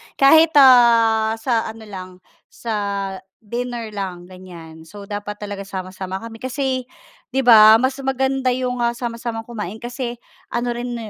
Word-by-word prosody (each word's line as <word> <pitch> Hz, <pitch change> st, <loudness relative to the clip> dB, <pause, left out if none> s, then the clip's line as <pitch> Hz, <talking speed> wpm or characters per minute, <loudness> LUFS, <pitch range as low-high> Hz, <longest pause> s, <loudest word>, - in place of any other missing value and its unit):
Kahit 315 Hz, +3 st, +5 dB
ah, 230 Hz, -4 st, +5 dB
sa 225 Hz, 0 st, -1 dB
ano 220 Hz, 0 st, -9 dB
lang 185 Hz, -3 st, -9 dB, 0.4 s
sa 230 Hz, -, -7 dB, 0.7 s
dinner 235 Hz, 0 st, -5 dB
lang 185 Hz, -4 st, -5 dB
ganyan, 170 Hz, -3 st, -13 dB
so 205 Hz, +3 st, -11 dB
dapat 205 Hz, +1 st, -6 dB
talaga 200 Hz, -1 st, -7 dB
sama-sama 185 Hz, 0 st, -6 dB
kami. 225 Hz, 0 st, -9 dB
Kasi 260 Hz, 0 st, -3 dB, 0.4 s
'di 265 Hz, 0 st, -1 dB
'ba 220 Hz, -2 st, +8 dB
mas 260 Hz, +4 st, 0 dB
maganda 265 Hz, 0 st, -1 dB
'yong 250 Hz, -1 st, -3 dB, 0.2 s
sama-samang 230 Hz, -1 st, -5 dB
kumain 220 Hz, -1 st, -7 dB
kasi 245 Hz, 0 st, -5 dB, 0.3 s
ano 240 Hz, 0 st, -2 dB
rin 240 Hz, 0 st, -4 dB
230 Hz, 135 wpm, -20 LUFS, 205-250 Hz, 0.7 s, ba